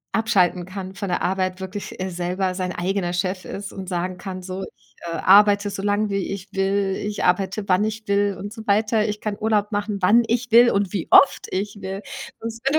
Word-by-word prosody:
abschalten 185 -5 +2
kann 190 0 -7
von 200 +1 -5
der 180 - -1
Arbeit, 185 0 -1
wirklich, 190 +1 -7
äh, 185 - -2
selber 180 +1 -2
sein 185 -1 -3
eigener 180 0 -1
Chef 185 +1 -2
ist 200 -1 -6
und 190 -1 -7
sagen 180 0 -2
kann: 185 -2 -6
„So, 185 +1 -5
ich, - - -32 0.2
äh, - - -3
arbeite 205 +2 +5
so 195 - -5
lang, 205 +1 0
wie 195 - 0
ich 195 0 -7
will. 195 0 0
Ich 205 0 -3
arbeite, 195 +2 0
wann 185 +2 +3
ich 215 0 -4
will 200 -1 +1
und 205 +2 -7
so 225 - -9
weiter. 215 +1 +2
Ich 210 0 -4
kann 210 -1 -3
Urlaub 210 -1 +1
machen, 205 0 -2
wann 210 +6 +5
ich 235 +1 -1
will 240 +2 +7
und 200 -3 0
wie 190 -5 -2
oft 280 - +6
ich 205 +2 -3
will. 195 +2 -5 0.4
Wenn 230 +4 -3
200 Hz, 210 wpm, -22 LUFS, 185-210 Hz, 0.4 s, will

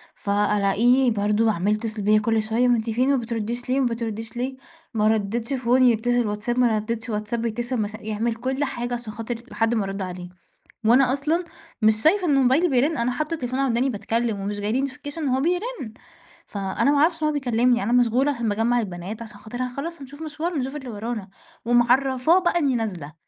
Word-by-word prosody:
فألاقيه 210 +5 +2
برضه 210 +1 +2
عَمّال 205 +2 +1
يتّصل 215 0 -3
بيّا 215 +1 +4
كل 225 +1 +1
شوية 230 +3 +1
"وأنتِ 230 -2 +1
فين 255 +5 +2
وما 260 - +1
بتردّيش 235 +2 -4
ليه، 260 +2 +2
وما 260 - +2
بتردّيش 225 0 -5
ليه؟" 260 +2 -2 0.4
ما 215 -1 +2
ردِّتش 220 +4 0
phone 255 0 +2
يتّصل 245 -1 +3
واتساب، 210 +4 -2
ما 245 - +5
ردِّتش 230 +3 -4
واتساب 215 +2 -2
يتّصل 240 +3 -2
مث 210 +1 -3
يعمل 220 +2 -2
كل 260 +4 -2
حاجة 245 -3 -3
عشان 235 -3 -5
خاطر 230 +2 -4 0.2
لحد 225 +1 +1
ما 220 - +1
أرُد 195 +1 -4
عليه. 180 -1 -6 0.6
وأنا 250 +3 +5
أصلًا 310 +6 0 0.4
مش 215 0 +3
شايفة 365 +4 +4
إنه 275 -3 +4
موبايلي 265 +8 +4
بيرن، 275 +4 +2
أنا 235 +1 0
حاطّة 305 +5 -2
التليفون 255 -4 -3
على 270 -3 +2
وداني 245 +4 +1
باتكلّم 225 0 -1
ومش 205 +1 -3
جاي 205 +1 -1
لي 270 +3 +1
notification 285 +3 -8
إن 310 -3 -2
هو 260 +1 +1
بيرن. 355 - -2 0.5
فأنا 200 +7 0
ما 290 - +2
أعرفش 320 +2 +2
إن - - +3
هو 305 - 0
بيكلّمني، 245 -4 +2
أنا 220 - -1
مشغولة 245 +3 +3
عشان 235 -4 -2
باجمّع 225 +4 +1
البنات 195 +1 -5
عشان 215 -3 -9
خاطر 220 +4 -7
ه - - -1
خلاص 330 +2 -5
هنشوف 285 +3 -11
مشوارن 315 +1 -3
نشوف 265 +3 -3
اللي 270 -4 -6
ورانا، 215 -2 -5 0.4
ومعرّفاه 255 +6 +3
بقى 345 -1 +1
إنّي 275 -5 +1
نازلة، 180 -10 -4
240 Hz, 200 wpm, -23 LUFS, 215-265 Hz, 0.6 s, ما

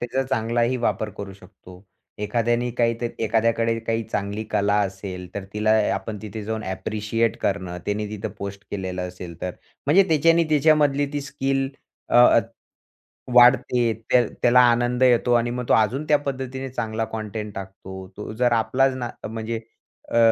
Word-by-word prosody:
त्याचा 125 +2 -1
चांगलाही 120 0 0
वापर 110 -3 -1
करू 100 -1 -6
शकतो. 95 -1 -16 0.4
एखाद्याने 120 +3 0
काही 115 -1 +3
तर 120 - -1 0.2
एखाद्याकडे 115 +1 +1
काही 115 0 -1
चांगली 100 +1 -3
कला 100 0 +2
असेल, 95 -2 -4
तर 100 - -4
तिला 105 +1 0 0.2
आपण 110 -2 -5
तिथे 110 0 -6
जाऊन 110 0 -3
ॲप्रिशिएट 105 +4 -1
करणं, 95 -3 -2
त्याने 105 +1 -1
तिथं 105 +1 -5
पोस्ट 100 0 -6
केलेलं 95 -2 -4
असेल 90 -2 -10
तर. 90 - -2 0.4
म्हणजे 175 +7 +6
तेच्यानी 165 +2 +4
त्याच्यामधली 145 -1 +3
ती 145 - -2
स्किल, 135 -1 -1 0.4
अ, 120 -1 +6 1.0
वाढते. 120 -1 +5 0.2
त्या 125 -1 +5 0.2
त्याला 125 +1 +6
आनंद 120 +1 +1
येतो 125 -1 +4
आणि 120 0 +2
मग 125 +1 -3
तो - - +5
अजून 115 +7 +2
त्या 150 - +5
पद्धतीने 135 -1 -4
चांगला 115 -3 -2
कंटेंट 105 -1 -5
टाकतो. 95 -1 -8
तो 105 - -6
जर 120 +1 +2
आपलाच 130 +4 +2
ना 120 -2 -4 0.2
म्हणजे 110 +1 -4 0.5
अ, - - +3
115 Hz, 155 wpm, -23 LUFS, 100-125 Hz, 1.0 s, म्हणजे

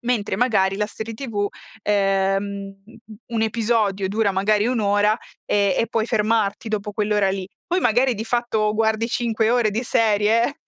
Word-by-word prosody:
mentre 235 -5 -1
magari 195 -5 +2
la 210 - 0
serie 220 +1 -7
tv, 210 -5 -3 0.3
ehm, 195 -1 +1
uhm, 195 -1 -8
mhmm, 220 -1 -15
un 225 -1 -1
episodio 215 -3 0
dura 210 0 +1
magari 205 +3 +1
1 250 -1 0
ora, 205 +1 +2 0.3
ehm, 200 -2 +2
e 230 - +1
puoi 225 0 -1
fermarti 215 -1 0
dopo 210 -1 -3
quell'ora 205 -2 +1
lì. 190 -1 -4 0.2
Poi 360 +1 0
magari 250 +1 +2
di 220 +1 -5
fatto 225 -3 0
guardi 220 +1 +1
5 225 -2 0
ore 240 -3 +2
di 225 +4 -2
serie, 225 +3 +2
215 Hz, 170 wpm, -22 LUFS, 200-230 Hz, 0.3 s, magari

